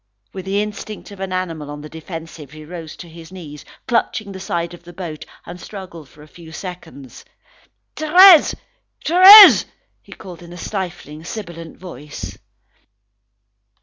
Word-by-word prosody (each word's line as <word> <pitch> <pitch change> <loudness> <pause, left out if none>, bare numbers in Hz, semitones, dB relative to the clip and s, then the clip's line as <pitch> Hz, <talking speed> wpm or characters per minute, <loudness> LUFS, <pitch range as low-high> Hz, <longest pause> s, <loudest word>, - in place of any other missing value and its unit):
With 190 -1 -8
the 200 +2 -1
instinct 210 0 -9
of 200 - -13
an 190 -1 -5
animal 165 -5 -5
on 145 0 -8
the 150 - -10
defensive, 160 -2 -10
he 155 0 -12
rose 165 -1 -10
to 175 - -12
his 165 +1 -14
knees, 155 -6 -11 0.2
clutching 230 -3 -2
the 190 - -9
side 170 -2 -4
of 175 - -13
the 175 0 -15
boat, 165 -4 -8 0.2
and 175 +1 -11
struggled 180 -8 -11
for 150 - -18
a - - -16
few 165 +1 -15
seconds. 165 -7 -11 0.7
"Thérèse! 345 +2 +6 0.5
Thérèse!" 385 +4 +9 0.4
he - - -21
called 180 -3 -12
in 175 0 -13
a - - -11
stifling, 175 -6 -7
sibilant 170 -4 -9
voice. 150 -5 -10
175 Hz, 150 wpm, -18 LUFS, 160-195 Hz, 0.7 s, Thérèse